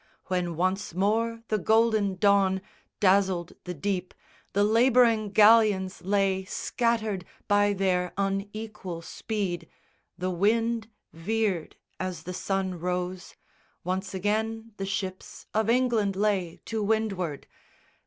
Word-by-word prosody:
When 180 -2 -1
once 185 +1 -1
more 225 +4 0
the 215 - +1
golden 220 -2 +3
dawn 195 -1 +3 0.4
Dazzled 190 -3 +2
the 180 0 -5
deep, 185 +3 -3 0.4
the 205 - +3
labouring 230 -1 +4
galleons 210 -3 +5
lay 195 0 +1
Scattered 220 -3 -1 0.2
by 205 0 +3
their 185 -2 0
unequal 195 -2 -3
speed. 195 -2 -4 0.5
The 185 +1 -2
wind 225 +4 +1 0.2
Veered 195 0 -1 0.2
as 185 -1 -4
the 180 - -6
sun 190 -1 -2
rose. 180 +1 -3 0.5
Once 190 +2 -3
again 220 +3 -1
the 195 - -3
ships 190 -1 -5
Of 220 0 +1
England 230 -5 +2
lay 195 -4 0
to 225 -1 -2
windward. 200 -8 -1
200 Hz, 115 wpm, -27 LUFS, 185-220 Hz, 0.5 s, galleons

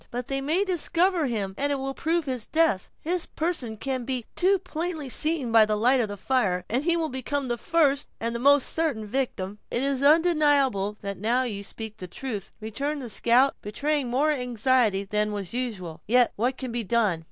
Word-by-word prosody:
"But 245 0 -5
they 270 0 -1
may 320 +8 +1
discover 350 -2 +1
him, 205 -5 -2
and 285 +1 +1
it - - +1
will 270 0 -4
prove 330 +3 -1
his 255 -5 -4
death. 315 - +2
His 345 +2 -1
person 310 -10 -2
can 260 +2 -3
be 250 -2 -3
too 385 +2 +3
plainly 335 -5 -4
seen 300 -3 +1
by 225 -1 +7
the 215 - +1
light 250 +5 +4
of 230 - +1
that 205 0 -7
fire, 195 -7 0
and 250 +5 -1
he 340 +1 +2
will 325 -1 0
become 260 +1 -3
the 240 - -1
first 290 -2 +2
and 230 +1 -2
most 280 0 +5
certain 305 -10 -1
victim." 210 -4 -3
"It 240 - -1
is 275 -1 0
undeniable 285 - +3
that 200 -2 -5
now 235 +5 +2
you 205 -5 -4
speak 220 +1 -8
the 185 - -7
truth," 210 0 -6
returned 275 +8 -3
the 240 - -6
scout, 245 +5 +3
betraying 285 +6 -1
more 280 +5 +2
anxiety 245 -5 +1
than 210 +1 -1
was 200 -2 -5
usual; 210 -10 -4
"yet 245 +2 +4
what 250 +5 -1
can 255 -3 -5
be 235 0 -2
done? 210 -5 +1
255 Hz, 200 wpm, -26 LUFS, 220-290 Hz, -, by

